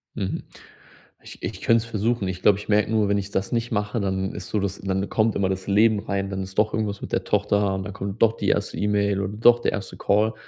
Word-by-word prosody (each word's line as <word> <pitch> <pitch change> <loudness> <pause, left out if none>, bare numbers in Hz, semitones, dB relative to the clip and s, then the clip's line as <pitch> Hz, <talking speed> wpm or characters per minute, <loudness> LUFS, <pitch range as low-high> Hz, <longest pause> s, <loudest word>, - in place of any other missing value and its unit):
Mhm. 95 -3 -3 0.8
Ich - - -13
ich - - -4
könnte 115 -1 +3
es - - -10
versuchen. 115 -1 -1
Ich 90 0 -5
glaube, 100 0 +5
ich 105 - -11
merke 105 0 +3
nur, 110 -2 +2
wenn 100 - +2
ich 100 0 -3
das 95 -1 -2
nicht 120 0 -1
mache, 105 +1 -1
dann 95 -1 -1
ist - - -7
so, 105 - 0
dass 100 0 -3
dann 95 0 -2
kommt 110 0 +1
immer 95 -1 +1
das 95 0 -3
Leben 105 +1 +4
rein, 100 -1 -2
dann 95 -1 -3
ist 95 0 -10
doch 105 0 +2
irgendwas 105 -2 -2
mit - - -7
der - - -1
Tochter 100 -1 +1
und 95 - -3
dann 100 - -6
kommt 100 +2 -6
doch 115 0 +4
die - - -2
1. - - 0
E-Mail 100 -1 +1
oder 100 +1 -3
doch 120 +1 +6
der - - 0
1. 100 -2 -5
Call. 105 +2 +2
100 Hz, 260 wpm, -24 LUFS, 95-110 Hz, 0.8 s, doch